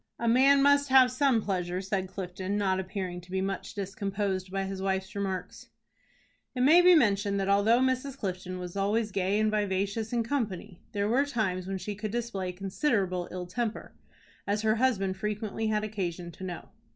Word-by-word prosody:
"A 235 - -2
man 275 +4 +5
must 285 0 +4
have 260 -1 +6
some 255 -4 +2
pleasure," 180 -2 -2
said 190 0 -2
Clifton, 185 +1 -4
not 190 -2 +1
appearing 185 -2 -4
to 180 - -18
be 190 +1 -1
much 195 +3 -3
discomposed 195 -1 -3
by 195 0 -1
his 195 0 -5
wife's 190 0 -2
remarks. 190 -2 -4 0.9
It 250 - -1
may 315 +7 +7
be 360 0 +7
mentioned 200 -7 +2
that 195 - -1
although 205 +4 +4
Mrs. 260 +1 0
Clifton 185 -4 -4
was 180 0 -7
always 210 +2 0
gay 195 +2 0
and 215 0 +2
vivacious 205 +1 -1
in 235 -1 +1
company, 215 -9 -3
there 200 -1 0
were 250 +6 +3
times 190 -8 -1
when 195 0 -2
she 190 +3 -5
could 210 +2 -5
display 210 -5 -3
considerable 190 - -1
ill 180 0 -5
temper, 225 +5 -4 0.5
as 205 +2 0
her 220 +1 +2
husband 195 -7 +1
frequently 210 +2 -3
had 215 -1 0
occasion 180 -5 -4
to 170 - -11
know. 180 -3 -6
200 Hz, 180 wpm, -29 LUFS, 190-225 Hz, 0.9 s, may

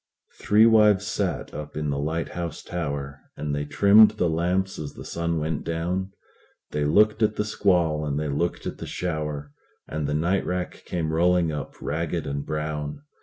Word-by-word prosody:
Three 105 +2 +5
wives 105 -3 +5
sat 100 -3 -2
up 75 0 -7
in 75 -1 -1
the 70 - -2
lighthouse 85 +2 -3
tower, 70 -5 -4 0.2
And 75 -1 -3
they 75 0 -2
trimmed 105 +7 +7
the 90 -6 0
lamps 90 +4 0
as 75 -2 -6
the - - -9
sun 85 0 -2
went 75 0 -2
down; 90 +4 -2 0.6
They 75 -1 0
looked 105 +8 +4
at 110 -1 +3
the 105 - -1
squall, 90 -7 +2
and 75 -1 -1
they 75 - -2
looked 75 +5 -1
at - - -5
the - - -6
shower, 75 -4 -3 0.4
And 75 -2 -3
the 75 - -1
night 85 +5 +1
rack 90 0 -3
came 80 -3 -2
rolling 85 0 +3
up 75 -2 -5
ragged 80 +1 -2
and 70 0 -3
brown. 75 - -4
80 Hz, 175 wpm, -25 LUFS, 75-90 Hz, 0.6 s, trimmed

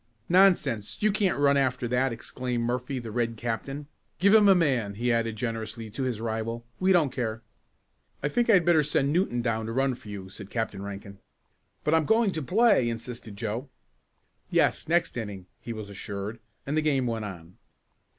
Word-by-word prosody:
"Nonsense, 175 - +3
you 215 - +4
can't 200 -2 +1
run 140 0 +4
after 125 -2 +1
that," 125 +2 +1
exclaimed 120 +1 -3
Murphy, 125 +3 -2
the 115 -3 -6
Red 115 0 -1
captain. 130 +6 -4 0.3
"Give 200 +2 +4
him 215 -2 +7
a 195 - +7
man," 130 - +1
he 120 +2 +1
added 115 -1 0
generously 115 -1 -4
to 120 - -5
his 125 -4 -1
rival. 115 +1 -3
"We 185 +1 +3
don't 165 -7 +4
care." 115 -3 -3 0.8
"I - - +2
think 240 +10 0
I - - +7
had 180 -4 +5
better 170 -3 +5
send 145 -1 +1
Newton 140 -9 +1
down 110 -2 -1
to - - -3
run 135 +2 +1
for 115 -3 -11
you," 100 -2 -7
said 95 +1 -9
Captain 110 -4 -3
Rankin. 100 0 -8 0.6
"But 150 - +1
I'm 160 -1 +3
going 220 +1 +3
to 160 - -3
play," 200 - +3
insisted 115 -2 -6
Joe. 115 +5 -4 0.8
"Yes, - - +2
next 170 +2 +1
inning," 100 -5 -5
he 120 - -7
was 110 -2 -6
assured, 100 +2 -6 0.3
and 140 - -2
the 155 - +3
game 140 -4 +1
went 115 -2 -2
on. 90 -3 -9
120 Hz, 190 wpm, -27 LUFS, 110-150 Hz, 0.8 s, him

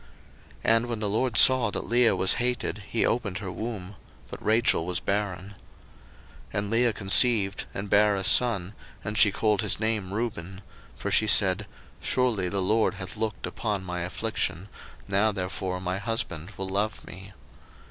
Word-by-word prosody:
01:029:031 - - -24 0.5
And 115 +1 +2
when 120 -2 -3
the 105 -1 -1
LORD 115 +2 -1
saw 130 -4 +7
that - - -4
Leah 120 0 +3
was 95 - +4
hated, 125 -3 -1
he 115 - 0
opened 105 -6 -1
her 95 -2 -6
womb: 100 -1 -6 0.4
but - - -8
Rachel 115 -3 +2
was 90 -1 0
barren. 100 -3 -3
01:029:032 - - -14 1.0
And 100 +1 -2
Leah 115 0 +2
conceived, 100 0 +3
and 100 +2 -6
bare 105 +1 +3
a 95 - -3
son, 100 -3 +4 0.3
and 105 - -4
she 105 -1 +5
called 105 0 0
his 105 -3 +1
name 110 -4 -1
Reuben: 100 -4 -5 0.3
for - - -5
she 110 - +3
said, 100 0 +4 0.3
Surely 115 -8 0
the 95 0 -1
LORD 110 +2 +1
hath 95 -2 -7
looked 110 -2 -4
upon 105 -4 -3
my 90 -1 -5
affliction; 95 0 -3 0.4
now 100 +2 +1
therefore 90 -1 -4
my 90 +1 -3
husband 95 -7 -2
will 95 - -4
love 105 +3 -2
me. 95 +2 -12
105 Hz, 170 wpm, -26 LUFS, 95-115 Hz, 1.0 s, saw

